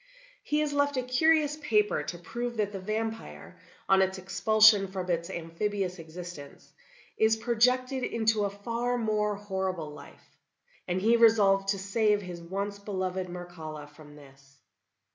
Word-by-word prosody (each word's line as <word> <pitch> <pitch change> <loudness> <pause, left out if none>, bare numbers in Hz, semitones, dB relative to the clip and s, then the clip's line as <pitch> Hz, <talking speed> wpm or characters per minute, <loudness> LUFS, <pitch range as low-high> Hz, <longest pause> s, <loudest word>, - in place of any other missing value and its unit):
He 300 0 0
has 300 -1 -1
left 285 -1 +1
a 255 - 0
curious 300 +3 +2
paper 210 - +1
to 150 +3 -6
prove 235 +7 -5
that 205 -1 0
the 195 - -5
vampire, 220 +3 -5 0.3
on 190 0 +5
its 190 0 0
expulsion 200 +2 +4
from 185 -1 -4
its 170 +1 -1
amphibious 180 +2 -3
existence, 165 -3 -10 0.5
is 220 0 +4
projected 250 +3 +1
into 220 -3 +1
a - - 0
far 230 +5 -2
more 210 -2 0
horrible 190 -6 -3
life; 145 -1 -15 0.5
and 180 +1 0
he 225 +4 +4
resolved 205 -4 +4
to 195 0 +1
save 205 +1 +1
his 175 -2 -8
once 200 +4 -4
beloved 185 -2 -3
Mircalla 170 -4 -8
from 150 -1 -15
this. 135 -1 -18
200 Hz, 145 wpm, -28 LUFS, 180-225 Hz, 0.5 s, on